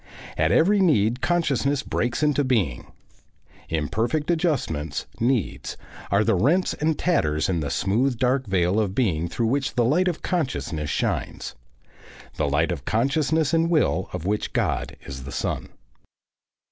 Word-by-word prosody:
At 80 +1 +2
every 200 +5 +4
need 125 - +3
consciousness 145 -5 +1
breaks 120 +5 -1
into 145 -1 +2
being. 105 - 0 0.8
Imperfect 115 - -1
adjustments, 140 - -1
needs, 120 -3 -1 0.3
are 100 +2 +3
the - - +2
rents 145 - +2
and 155 0 0
tatters 80 - +1
in 90 -3 0
the 75 -2 -2
smooth 110 - +1
dark 130 0 +1
veil 95 +1 +2
of 100 -3 -1
being 85 -10 +1
through 115 - -1
which 135 +4 0
the 120 -2 +3
light 170 +9 +2
of 175 -3 -2
consciousness 125 - -2
shines - - -2 0.8
the 75 -2 0
light 80 +5 +1
of 75 -7 -4
consciousness 145 - +1
and 165 0 +3
will 160 -3 +1
of 80 - -5
which 105 +2 -1
God - - -1
is 65 -1 -7
the 70 - -8
sun. - - -3
120 Hz, 145 wpm, -24 LUFS, -, 0.8 s, every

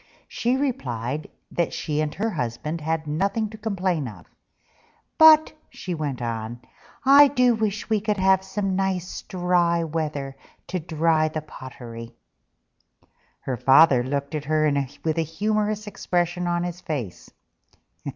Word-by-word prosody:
She 245 +2 0
replied 140 - -3 0.2
that 170 - -1
she 150 -1 -2
and 155 -1 -1
her 220 +3 -1
husband 150 - -3
had 160 +1 -2
nothing 200 +8 -1
to 220 - -9
complain 185 - -1
of: 110 - -11 0.9
"But," 315 -1 +8 0.2
she 180 - -6
went 145 -6 -3
on, 115 0 -4 0.5
"I 280 +2 +8
do 250 -3 +3
wish 215 -2 -2
we 215 -2 +1
could 210 0 -1
have 190 0 +3
some 195 0 -2
nice 185 -2 -2
dry 175 -2 +1
weather, 150 -4 -3 0.3
to 185 - -2
dry 160 -1 +1
the 155 0 -4
pottery." 120 -5 -10 1.3
Her 130 -2 -3
Father 135 +1 +6
looked 140 +3 -3
at 150 -1 -3
her 155 +1 +2 0.4
with 160 0 0
a - - +3
humorous 210 +6 -1
expression 175 -3 -1
on 175 0 0
his 175 0 -5
face. 135 - -5
165 Hz, 140 wpm, -24 LUFS, 150-200 Hz, 1.3 s, But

